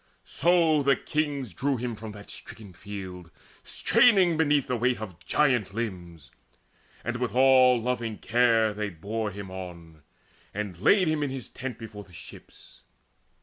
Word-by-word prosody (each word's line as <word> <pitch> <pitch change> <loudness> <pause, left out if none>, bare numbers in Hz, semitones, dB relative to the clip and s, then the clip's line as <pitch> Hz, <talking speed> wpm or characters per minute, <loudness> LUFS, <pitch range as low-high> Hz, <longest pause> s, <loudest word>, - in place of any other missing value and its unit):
So 165 -3 +3
the 140 0 +4
kings 145 - -2
drew 135 +8 -1
him 120 0 -3
from 110 0 -8
that 100 0 -11
stricken 105 -5 -10
field 95 -2 -8 0.3
Straining 190 -8 +4
beneath 150 -3 +2
the 125 - -1
weight 125 +1 +1
of 90 -5 -9
giant 120 -4 +1
limbs, 90 - -6 0.7
And 120 +1 -3
with 125 -1 -3
all 130 -1 +6
loving 115 -2 -2
care 115 -2 +2
they 105 0 -3
bore 105 +5 -4
him 100 -1 -8
on, 85 -4 -9 0.5
And 100 -3 -4
laid 185 - +4
him 155 -1 0
in 145 - 0
his 130 -3 -6
tent 125 -2 -6
before 105 -2 -9
the 95 -2 -20
ships. 80 -2 -14
115 Hz, 150 wpm, -27 LUFS, 100-135 Hz, 0.7 s, all